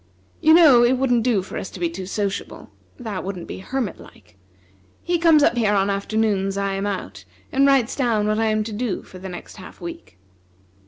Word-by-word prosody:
You 315 +1 +6
know 290 -8 +7
it 250 +2 +3
wouldn't 245 -2 +2
do 225 -5 +1
for - - -6
us - - -6
to - - -11
be 175 - +1
too 180 +2 -7
sociable. 200 0 -4 0.3
That 220 -7 -5
wouldn't 185 -3 -6
be - - -7
hermit 235 0 -4
like. - - -17 0.7
He 345 -1 0
comes 320 -3 +5
up 245 - +3
here 215 -3 +2
on 195 -1 +2
the - - +1
afternoons 200 -1 -1
I 200 0 -1
am 195 +1 -2
out, 100 - -5 0.3
and 275 +1 +3
writes 265 -3 +2
down 230 -6 +1
what 215 +1 0
I 225 - +1
am 215 0 +1
to 215 0 -6
do 220 -2 -3
for 185 - -13
the 190 +1 -7
next 175 +3 -10
half 185 - -12
week." 95 - -9
210 Hz, 215 wpm, -22 LUFS, 190-245 Hz, 0.7 s, know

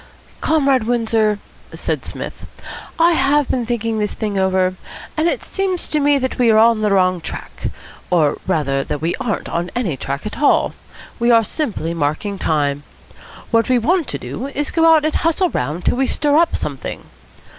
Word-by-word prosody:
"Comrade 275 -6 +2
Windsor," 225 -3 +1 0.4
said - - -2
Psmith. - - -7 0.5
"I 335 +1 +5
have 290 -2 +2
been 245 -3 -1
thinking 230 -2 -1
this 210 -1 -2
thing 210 -2 -3
over, 190 -1 +2 0.4
and 315 +2 +1
it - - -1
seems 380 -2 -2
to 305 - +1
me 290 0 +3
that 260 -1 -3
we 240 -2 +4
are 220 - +5
on 225 0 +5
the 210 - +2
wrong 185 -3 +2
track, - - -6 0.4
or 160 -5 +2
rather 140 -6 0 0.2
we 165 +3 -1
aren't 215 -5 -3
on 175 +1 -2
any 215 - -1
track 140 +4 -5
at 215 - -5
all; 290 - +3 0.5
we 235 +1 +2
are 230 -1 +6
simply 205 - -2
marking 165 +6 -2
time. 145 -3 0 0.7
What 230 +1 +2
we 255 - +4
want 325 +7 +1
to - - -3
do 260 - -6
is 285 +1 -3
to - - -11
go 330 0 +5
out 310 -2 +4
and 310 - 0
hustle 335 +2 +1
round 150 +8 -3
till - - +2
we 265 0 +2
stir 290 -1 +1
up 330 +2 +3
something. 140 -3 -5
230 Hz, 185 wpm, -19 LUFS, 185-290 Hz, 0.7 s, are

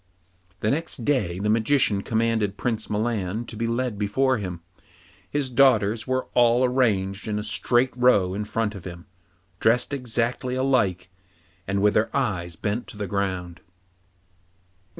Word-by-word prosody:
The 110 - +1
next 140 -5 -2
day 105 -12 +1
the 100 +2 -2
Magician 115 -1 +2
again 100 - -5
commanded 110 -3 0
Prince 115 -3 -2
Milan 105 0 -1
to 115 - -7
be 115 +2 -2
led 115 -2 -2
before 130 +5 +1
him. 90 -4 -5 0.7
His 140 -3 -2
daughters 115 -4 +3
were 130 0 0
all 120 +1 +4
arranged 105 -7 0
in 105 -1 -1
a 105 - -3
straight 120 +5 +1
row 115 -7 +3
in 105 +2 -3
front 105 0 -1
of 100 -4 -9
him, 85 -1 -8 0.5
dressed 120 +5 +2
exactly 125 0 -2
alike, 120 -9 +1 0.6
and 100 +1 0
with 105 0 +4
their 110 +1 +2
eyes 90 -10 -2
bent 105 +7 -3
on - - -13
the 105 - -3
ground. 95 -3 -3
110 Hz, 150 wpm, -24 LUFS, 100-125 Hz, 0.7 s, all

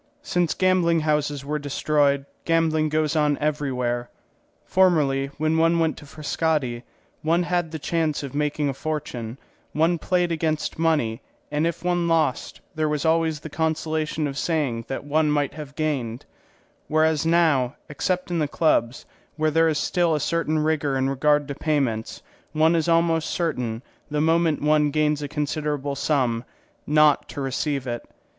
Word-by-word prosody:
Since 175 - 0
gambling 180 -3 +3
houses 150 -2 0
were 150 +1 -2
destroyed 145 -1 +1 0.2
gambling 160 -2 +2
goes 155 +1 0
on 150 -2 +2
everywhere. 125 -5 -1 0.6
Formerly, 150 -8 +3
when 155 +1 +1
one 165 +1 +3
went 160 -1 +1
to 145 - -12
Frascati, 150 -5 -1 0.4
one 165 +3 +2
had 175 -1 -1
the 160 - -5
chance 155 -1 -1
of 140 - -6
making 150 0 0
a 140 - -1
fortune; 135 -6 -4 0.4
one 165 +2 +2
played 180 -1 +1
against 160 -1 -1
money, 145 -8 +1 0.3
and 150 +2 +1
if 170 0 -4
one 175 -1 +1
lost, 160 -6 0
there 155 -1 0
was 150 0 -1
always 160 -1 +1
the 160 - -7
consolation 160 -1 -1
of 140 -1 -3
saying 140 -9 -1
that 135 - -4
one 150 +2 +1
might 145 -2 0
have 150 -2 -9
gained; 135 -7 -2 0.6
whereas 155 0 +2
now, 160 -6 +2
except 180 +5 -2
in 170 - 0
the 150 - +1
clubs, 135 -5 +1 0.3
where 155 0 +1
there 165 +1 +4
is 155 - 0
still 170 +1 +1
a - - 0
certain 160 +1 0
rigour 150 -3 0
in 135 +1 +1
regard 145 +1 +2
to 140 - -4
payments, 135 -8 -1 0.3
one 160 +2 +4
is 165 +1 +1
almost 165 -1 +2
certain, 125 -9 -2 0.3
the 150 0 -1
moment 160 -1 +2
one 150 0 +3
gains 150 0 +1
a 145 - -3
considerable 150 -1 -2
sum, 130 -5 0 0.4
not 150 -1 +4
to - - -7
receive 135 0 -2
it. 120 -2 -5
150 Hz, 160 wpm, -24 LUFS, 140-160 Hz, 0.6 s, there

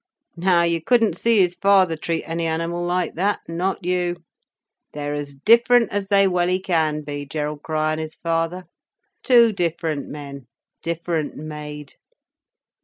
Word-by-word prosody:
Now 175 0 +3
you 170 -1 0
couldn't 230 +3 +2
see 230 -3 +3
his 180 -1 +2
father 190 -3 +3
treat 165 +1 -3
any 165 0 -2
animal 165 +2 -2
like 180 0 -1
that—not 185 0 -2
you. 180 -1 0 0.8
They're 145 0 -4
as 145 -1 -5
different 235 - +4
as 200 -1 -2
they 195 -1 +4
welly 180 0 +1
can 160 -5 0
be, 145 0 -5
Gerald 150 0 -4
Crich 155 0 -3
and 155 - -2
his 155 0 -6
father—two 180 - 0
different 165 -5 -2
men, 140 -3 -9 0.3
different 165 -2 -3
made." 150 -1 -8
170 Hz, 135 wpm, -22 LUFS, 155-185 Hz, 0.8 s, different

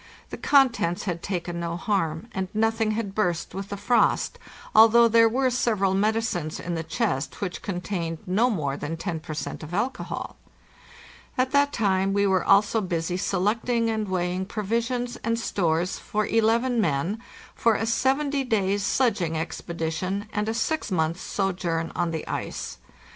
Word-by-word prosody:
The - - -5
contents 245 -11 +3
had 175 -4 -3
taken 175 -2 -3
no 170 0 -3
harm, 185 -2 -1
and 190 -1 -2
nothing 225 0 +2
had 210 -3 -3
burst 180 -5 -1
with 195 +1 -5
the 200 - -4
frost, 235 +5 +2 0.3
although 230 +2 +7
there 230 0 +5
were 255 +2 +1
several 215 -6 +1
medicines 205 -6 0
in 175 - -4
the 165 - -1
chest 165 - -2
which 185 -3 -4
contained 180 -3 -3
no 210 +7 +2
more 150 - -1
than 150 +3 -4
10 165 -1 -3
per 155 0 -7
cent. - - -5
of 160 +3 -6
alcohol. 245 +5 -3 1.0
At 255 0 +1
that 285 0 +3
time 195 -4 +1
we 200 0 +2
were 190 -2 +2
also 205 +3 +4
busy 175 -2 -2
selecting 220 +5 0
and 215 -1 -2
weighing 180 0 -1
provis 225 +3 -1
ions 245 -1 -3
and 230 0 -1
stores 175 -5 0
for 215 0 -1
eleven 230 +2 +2
men 170 +5 0 0.3
for 230 -2 +2
a 225 - -1
seventy 270 +4 +1
days' 205 -5 +1
sledging 200 -10 +1
expedi 160 0 -3
tion 190 +5 -3
anda 210 +2 -1
six 315 +5 -1
months' 165 -2 0
sojourn 175 -4 -1
on 175 -1 0
the 160 -1 -4
ice. - - -4
200 Hz, 160 wpm, -25 LUFS, 175-230 Hz, 1.0 s, although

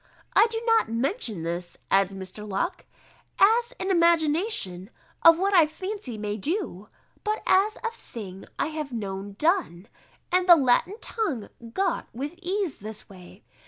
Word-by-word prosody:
I 420 +4 +6
do 450 0 -2
not 455 - +3
mention 230 - -2
this," 175 +1 -4
adds 195 -1 +4
Mr. 195 +2 -8
Locke, 340 - -2 0.5
"as 465 +4 +4
an 380 +1 -1
imagination 330 - +2 0.3
of 330 0 +8
what 390 +3 +1
I 335 -5 +6
fancy 370 - -6
may 210 0 -3
do, 220 - -3 0.3
but 425 0 -2
as 405 +4 +3
of - - -16
a - - -18
thing 195 - -9
I - - 0
have 305 -3 -5
known 200 -3 -5
done, 305 - 0 0.4
and 365 0 +2
the 345 - +12
Latin 275 +7 +2
tongue 300 - -2 0.2
got 390 - 0
with 280 +6 -4
ease 370 -3 -2
this 215 +1 -8
way." 185 +1 -14
300 Hz, 155 wpm, -26 LUFS, -, 0.5 s, the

